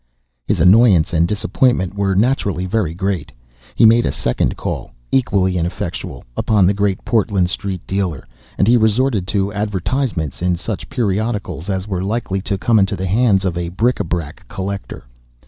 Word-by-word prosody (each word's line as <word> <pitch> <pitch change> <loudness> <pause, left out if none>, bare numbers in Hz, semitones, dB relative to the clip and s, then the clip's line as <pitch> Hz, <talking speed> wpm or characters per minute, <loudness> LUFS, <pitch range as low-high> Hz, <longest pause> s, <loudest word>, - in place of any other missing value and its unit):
His - - +1
annoyance 95 -1 +5
and 85 +1 +3
disappointment 105 -1 +1
were 100 -1 0
naturally 100 -5 +1
very 90 -4 -1
great. 90 -5 -2 0.4
He - - +5
made 115 +2 +6
a - - 0
second 60 - -1
call - - -5 0.2
(equally 95 -8 +2
ineffectual) 85 +1 -4
upon 105 -4 +2
the 95 - +3
Great 100 -1 -1
Portland 100 -6 +1
Street 95 -3 -4
dealer, 95 -7 -2 0.3
and 100 - +2
he 120 +1 +6
resorted 110 -2 +1
to 100 -1 0
advertisements 105 - -2
in 90 0 +1
such 100 +4 -5
periodicals 105 - -2
as 95 0 -2
were 95 -3 -2
likely 100 -2 -2
to 100 0 -2
come 115 +2 +3
into 100 0 +1
the 95 0 -4
hands 100 -1 +2
of 90 -3 -1
a 85 -1 -3
bric 115 +8 0
a - - +1
brac 80 -6 -5
collector. 100 +4 -6
100 Hz, 165 wpm, -18 LUFS, 90-110 Hz, 0.4 s, made